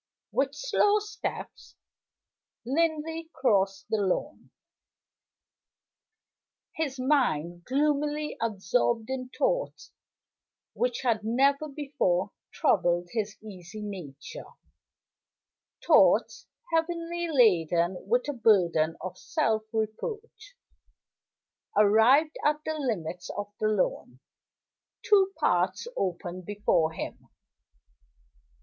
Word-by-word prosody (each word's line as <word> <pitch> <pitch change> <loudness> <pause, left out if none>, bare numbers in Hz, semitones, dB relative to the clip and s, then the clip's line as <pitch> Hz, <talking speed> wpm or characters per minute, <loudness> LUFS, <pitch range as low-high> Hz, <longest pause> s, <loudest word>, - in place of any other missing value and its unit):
With 275 +1 0
slow 420 -2 +2
steps 420 0 -6 0.9
Linley 320 +3 -1
crossed 195 -6 +1
the 220 - +2
lawn; 190 -2 -2 2.3
his 280 -4 -3
mind 175 - 0
gloomily 295 +2 0
absorbed 225 +2 0
in 255 -1 -4
thoughts - - -2 0.8
which 245 -1 -1
had 225 -4 +1
never 275 +6 +2
before 275 - -1 0.2
troubled 175 0 +1
his 215 -2 -3
easy 205 0 -9
nature 190 - -8 1.4
thoughts - - +4 0.3
heavily 340 +1 -1
laden 175 - +3
with 245 +5 +1
a 290 - -1
burden 175 - +3
of 185 0 -7
self 225 -9 0
reproach. 425 - -5 1.2
Arrived 225 +9 +5
at 300 0 +3
the 315 - -1
limits 180 - -3
of 205 0 -5
the 215 - +1
lawn, 185 -11 -1 0.8
two 390 -2 +4
paths 185 - +1
opened 180 -1 -3
before 205 -6 +1
him. 160 - -7
230 Hz, 90 wpm, -28 LUFS, 190-300 Hz, 2.3 s, Arrived